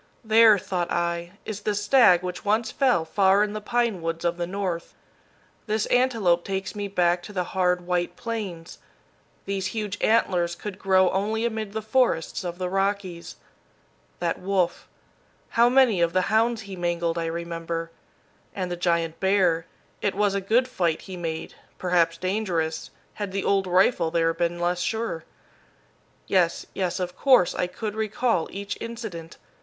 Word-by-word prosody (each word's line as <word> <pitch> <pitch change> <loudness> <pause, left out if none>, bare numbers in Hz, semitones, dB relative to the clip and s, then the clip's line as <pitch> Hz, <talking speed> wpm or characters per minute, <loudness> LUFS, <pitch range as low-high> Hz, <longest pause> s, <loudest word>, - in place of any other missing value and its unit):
"There," 220 -1 +6
thought 185 -3 -3
I, 170 +1 -1
"is 210 -1 -5
the 210 0 -1
stag 205 -4 +5
which 180 0 -5
once 220 +2 +1
fell 250 -12 +2
far 195 +4 +3
in 210 0 -2
the 215 - -4
pine 235 -4 0
woods 165 +1 -3
of 170 0 0
the 175 -1 -2
North. 180 -3 -4 0.7
This 215 0 0
antelope 225 -9 +2
takes 195 -1 -3
me 205 -1 -4
back 175 -2 +1
to 210 - -10
the 185 -3 -1
hard, 180 -1 0
white 175 0 -1
Plains. 200 -8 -6 0.7
These 195 -1 -2
huge 205 -2 -3
antlers 175 -6 +2
could 205 0 -7
grow 190 -2 +3
only 215 +4 0
amid 220 -3 -3
the 220 0 -3
forests 225 - +1
of 175 -1 -5
the 180 0 -2
Rockies. 195 -2 -2 0.8
That 170 -1 -2
wolf 185 -2 -1 0.6
how 235 +1 +4
many 250 -8 +4
of 170 0 +2
the 185 - +3
hounds 230 +1 +2
he 200 -1 -8
mangled, 170 -1 -1
I 165 - -2
remember; 165 0 -4 0.6
and 185 -2 -3
the - - -1
giant 170 -2 0
bear, 185 -4 +2 0.3
it 200 - 0
was 205 0 +2
a 200 - -1
good 230 +6 +2
fight 175 -10 -1
he 190 - -8
made, 165 -2 -5 0.2
perhaps 170 -2 +1
dangerous, 180 -4 -2 0.2
had 205 -2 -5
the 195 0 -2
old 195 -1 +1
rifle 180 -1 +3
there 165 0 +1
been 170 +1 -1
less 175 +1 0
sure. 220 -4 -2 1.0
Yes, 180 -3 +1
yes, 180 -2 -2
of 180 -1 -3
course, 255 -10 +4
I 180 - -1
could 210 +4 -5
recall 220 -4 0
each 200 +1 -5
incident. 215 -8 -7
185 Hz, 160 wpm, -25 LUFS, 170-210 Hz, 1.0 s, There